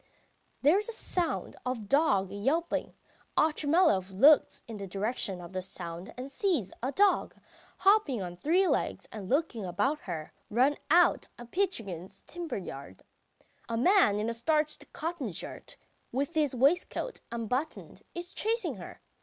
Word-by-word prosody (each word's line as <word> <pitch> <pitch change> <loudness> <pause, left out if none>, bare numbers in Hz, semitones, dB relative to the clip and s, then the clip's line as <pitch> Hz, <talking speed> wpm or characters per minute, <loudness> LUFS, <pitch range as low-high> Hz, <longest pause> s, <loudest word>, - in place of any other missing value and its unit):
There 310 +8 +6
is 420 - -4
the 465 - -4
sound 355 -5 -1
of 255 0 -1
a - - -8
dog 205 -6 +2
yelping. 275 +12 -1 0.4
Otchumyelov 300 - +3
looks 280 +11 +5
in 225 -2 -7
the 200 -1 -6
direction 195 0 -2
of 175 +1 -10
the 185 - -2
sound 175 +2 -7
and 260 +2 -6
sees 290 - 0
a 260 +3 -1
dog, 400 +6 +3 0.4
hopping 390 - +4
on 175 -2 -5
three 345 - +2
legs - - -1
and 200 -4 -7
looking 270 -6 0
about 260 - 0
her, 160 - -6 0.2
run 255 +7 +3
out 345 +3 +4
of 240 0 -11
Pitchugin's 200 - -3
timber 345 -2 -5
yard. 135 - -8 0.7
A 230 - -1
man 345 - +5
in 210 +1 -1
a 230 - -1
starched 305 +5 0
cotton 320 - -3
shirt, 165 - -7 0.3
with 280 +6 -1
his 300 -5 +1
waistcoat 310 - +1
unbuttoned, 250 +6 -3
is 350 +2 -6
chasing 460 +2 0
her. - - -10
260 Hz, 150 wpm, -30 LUFS, 200-330 Hz, 0.7 s, There